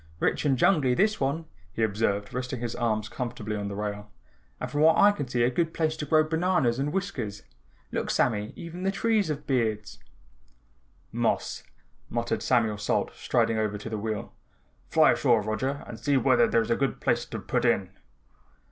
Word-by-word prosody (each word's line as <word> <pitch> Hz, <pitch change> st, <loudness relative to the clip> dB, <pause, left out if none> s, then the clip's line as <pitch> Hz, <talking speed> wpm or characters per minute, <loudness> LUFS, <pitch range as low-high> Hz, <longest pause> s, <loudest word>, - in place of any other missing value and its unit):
"Rich -, -, 0 dB
and 135 Hz, -3 st, +3 dB
jungly, 135 Hz, -4 st, +3 dB
this 210 Hz, +6 st, +2 dB
one," 140 Hz, +4 st, -1 dB, 0.3 s
he 115 Hz, -, -2 dB
observed, 105 Hz, -1 st, 0 dB
resting 125 Hz, 0 st, -3 dB
his 120 Hz, 0 st, -3 dB
arms 110 Hz, -2 st, 0 dB
comfortably 110 Hz, -2 st, -4 dB
on 100 Hz, -1 st, -3 dB
the 100 Hz, -, -5 dB
rail, 105 Hz, 0 st, -4 dB, 0.5 s
"and -, -, -5 dB
from 145 Hz, -, 0 dB
what 160 Hz, +1 st, +6 dB
I 205 Hz, -, +7 dB
can 145 Hz, -9 st, -4 dB
see 120 Hz, -1 st, +1 dB
a 120 Hz, -, +3 dB
good 165 Hz, +5 st, -1 dB
place 155 Hz, -1 st, 0 dB
to 150 Hz, -, -4 dB
grow 155 Hz, +2 st, +5 dB
bananas 160 Hz, -6 st, +1 dB
and 145 Hz, +2 st, -1 dB
whiskers. 140 Hz, -, -3 dB, 0.5 s
Look, -, -, -2 dB
Sammy, 105 Hz, -3 st, +1 dB
even 170 Hz, +2 st, -8 dB
the 190 Hz, -, +1 dB
trees 210 Hz, 0 st, +1 dB
have 150 Hz, -1 st, -4 dB
beards." 110 Hz, -6 st, -1 dB, 1.1 s
"Moss," -, -, -1 dB, 0.5 s
muttered 120 Hz, 0 st, -1 dB
Samuel 110 Hz, -4 st, +1 dB
Salt 105 Hz, -, 0 dB
striding 115 Hz, -2 st, 0 dB
over 105 Hz, -1 st, -1 dB
to 110 Hz, +2 st, -8 dB
the 110 Hz, -, -2 dB
wheel. 110 Hz, -1 st, -4 dB, 0.6 s
"Fly -, -, +5 dB
ashore 115 Hz, -3 st, +3 dB
Roger 130 Hz, +7 st, -2 dB
and 115 Hz, -, -9 dB
see 145 Hz, -2 st, +2 dB
whether 130 Hz, -3 st, +4 dB
there's 115 Hz, 0 st, +1 dB
a -, -, +4 dB
good 135 Hz, +1 st, -1 dB
place -, -, +1 dB
to -, -, -6 dB
put -, -, -1 dB
in." -, -, +1 dB
125 Hz, 185 wpm, -27 LUFS, 110-150 Hz, 1.1 s, I